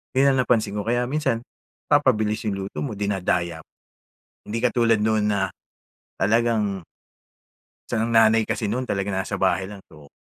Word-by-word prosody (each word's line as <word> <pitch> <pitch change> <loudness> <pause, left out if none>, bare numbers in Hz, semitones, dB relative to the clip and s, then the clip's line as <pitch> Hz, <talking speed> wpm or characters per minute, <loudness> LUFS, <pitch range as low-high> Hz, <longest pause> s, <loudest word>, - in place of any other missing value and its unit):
'yon 135 +1 +4
ang - - 0
napansin 110 -5 +1
ko - - -1
kaya 120 +2 +1
minsan 135 -5 0 0.5
papabilis 110 -8 +2
'yong 100 -2 -1
luto 100 - -7
mo 130 - -4
dinadaya. 90 -5 -1 0.8
Hindi 110 - -4
katulad 115 -3 +3
noon 110 -1 +2
na 95 -2 0 0.7
talagang 105 -3 +1 1.0
Saka 110 -2 0
ang 115 - -2
nanay 115 0 +5
kasi 110 0 -2
nun 125 +5 -1
talaga 100 -5 -2
nasa 95 +1 -2
bahay 95 -1 +2
lang, 100 -1 -9
so 75 -2 -16
110 Hz, 150 wpm, -23 LUFS, 100-120 Hz, 1.0 s, nanay